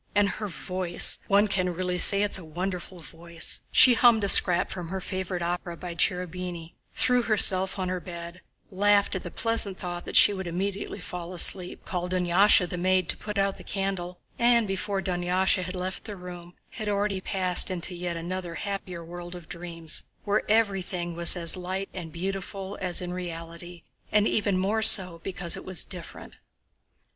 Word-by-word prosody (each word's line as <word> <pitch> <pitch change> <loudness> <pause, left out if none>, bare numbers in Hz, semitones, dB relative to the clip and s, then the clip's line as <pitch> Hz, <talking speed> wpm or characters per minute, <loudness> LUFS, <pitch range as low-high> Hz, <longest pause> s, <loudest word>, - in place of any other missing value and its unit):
and 205 0 +3
her 210 +2 -5
voice! 185 -1 +2
One 200 +2 +3
can 185 -3 -2
really 180 0 -3
say 200 +3 +6
it's 205 -2 +1
a - - -11
wonderful 180 +3 -6
voice!" 165 +1 -5
She 255 - +7
hummed 235 -2 +4
a 200 - +1
scrap 180 -2 +5
from 180 -3 -6
her 190 +3 -5
favorite 185 -1 -5
opera 175 0 -4
by 175 0 -7
Cherubini, 180 -1 -2 0.2
threw 250 -1 +2
herself 195 -4 +4
on 185 -1 -3
her 185 0 -3
bed, 170 0 -10 0.3
laughed 200 +1 +2
at 190 - -3
the 175 - -8
pleasant 225 -2 +1
thought 175 -1 -7
that - - -7
she 205 - +7
would 190 -2 -6
immediately 195 +4 -4
fall 180 -1 -8
asleep, 180 +1 +3
called 180 0 -4
Dunyásha 180 +1 +3
the 180 - -6
maid 185 -1 +1
to - - -1
put 210 0 -7
out 195 0 0
the - - -12
candle, 190 -2 -5 0.2
and 235 -2 +3
before 195 0 -3
Dunyásha 185 +1 0
had 185 +1 -6
left 185 +1 -5
the 210 - -7
room 180 -1 -11 0.2
had 215 -2 -5
already 200 -1 -1
passed 185 -1 +3
into 180 0 -2
yet 175 -1 -5
another 175 0 -6
happier 185 -3 -6
world 175 +1 -9
of 175 -3 -12
dreams, 170 -2 -2 0.2
where 205 0 0
everything 190 -5 -1
was 170 +1 +7
as 170 -2 +2
light 185 +2 -5
and 170 -3 -8
beautiful 195 +3 -6
as 180 -2 -2
in 180 0 -5
reality, 170 -1 -8 0.3
and 210 0 +3
even 200 -3 0
more 205 +4 -1
so 180 -6 +6
because 180 -3 -3
it - - -9
was 185 -2 0
different. 180 -3 -9
185 Hz, 180 wpm, -26 LUFS, 175-195 Hz, 0.3 s, She